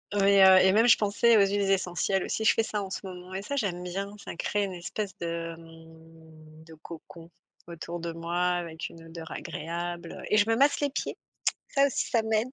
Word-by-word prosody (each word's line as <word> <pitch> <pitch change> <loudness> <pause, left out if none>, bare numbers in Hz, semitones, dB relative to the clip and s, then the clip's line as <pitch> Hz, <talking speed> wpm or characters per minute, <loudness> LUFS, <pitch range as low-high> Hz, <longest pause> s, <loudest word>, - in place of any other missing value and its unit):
Oui, 200 0 +4
heu, 190 0 +9
et 190 - +5
même 225 +3 +5
je 240 - +7
pensais 215 +2 +3
aux - - +6
huiles 200 0 0
essentielles 190 0 0
aussi, 220 - -2
je - - +6
fais 225 - +2
ça 210 -2 -3
en 190 - -8
ce - - -3
moment 185 0 -9
et 190 - -3
ça, 280 +7 -4
j'aime 185 -8 -2
bien, 195 +3 -4
ça - - -7
crée 205 +4 -1
une 190 -2 -6
espèce 195 +3 -5
de, 165 0 -4
mmh, 160 -1 -16
de 160 - -14
cocon, 165 +1 -12 0.4
autour 170 0 -7
de 170 0 -4
moi 170 +1 -4
avec 170 -2 -3
une 165 0 -14
odeur 165 0 -9
agréable 170 +3 -5
et 210 - +3
je 205 +1 +4
me 225 - +2
masse 280 +4 +3
les 285 -1 0
pieds, - - -4 0.5
ça 280 0 +4
aussi 270 - -2
ça 230 - +3
m'aide. 220 +2 0
180 Hz, 215 wpm, -28 LUFS, 165-205 Hz, 0.5 s, heu